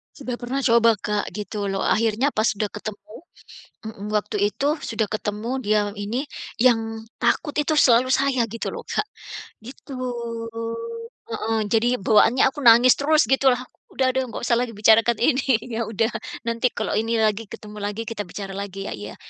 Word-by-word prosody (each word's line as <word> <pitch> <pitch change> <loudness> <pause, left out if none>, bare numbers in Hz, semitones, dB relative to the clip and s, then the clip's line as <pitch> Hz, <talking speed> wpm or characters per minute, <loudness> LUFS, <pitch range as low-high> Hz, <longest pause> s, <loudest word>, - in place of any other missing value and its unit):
Sudah 255 -4 -5
pernah 260 +3 -2
coba 230 -2 +5
Kak, 210 0 -2
gitu 210 -1 -4
loh. 195 0 -2
Akhirnya 230 +5 +2
pas 215 +1 +1
sudah 210 0 -1
ketemu 210 0 -7 0.8
heeh, 210 -2 -7
waktu 210 0 -1 0.2
itu 295 +3 0
sudah 225 -5 -2
ketemu 210 +1 -3
dia 210 0 +2 0.2
ini, 230 +8 -3 0.4
yang 225 -3 +2 0.2
takut 295 -3 0
itu 300 +1 +1
selalu 255 -3 +5
saya 265 -3 +2
gitu 230 +1 -4
loh, - - -7
Kak, 425 - -1 0.6
gitu. 265 +3 -10 1.4
Heeh, 225 0 -1
jadi 230 +1 +3
bawaannya 225 +5 +4
aku 280 - -15
nangis 240 +2 +8
terus 305 +2 +4
gitulah, 260 -2 +3 0.3
"Udah 260 -1 +2
deh 265 - +1
nggak 235 - -7
usah 235 -1 +2
lagi 240 -2 -2
bicarakan 220 +2 +4
ini. 260 +2 +3 0.3
Ya 230 -1 -1
udah, 225 +1 0 0.4
nanti 230 +1 0
kalau - - -2
ini 225 +1 -1
lagi 215 +1 +1
ketemu 210 +1 -10
lagi, 205 +2 -3
kita 215 -2 -3
bicara 195 +2 -7
lagi 195 0 -5
ya. - - -5
'iya'." 105 0 -8
225 Hz, 165 wpm, -23 LUFS, 210-255 Hz, 1.4 s, nangis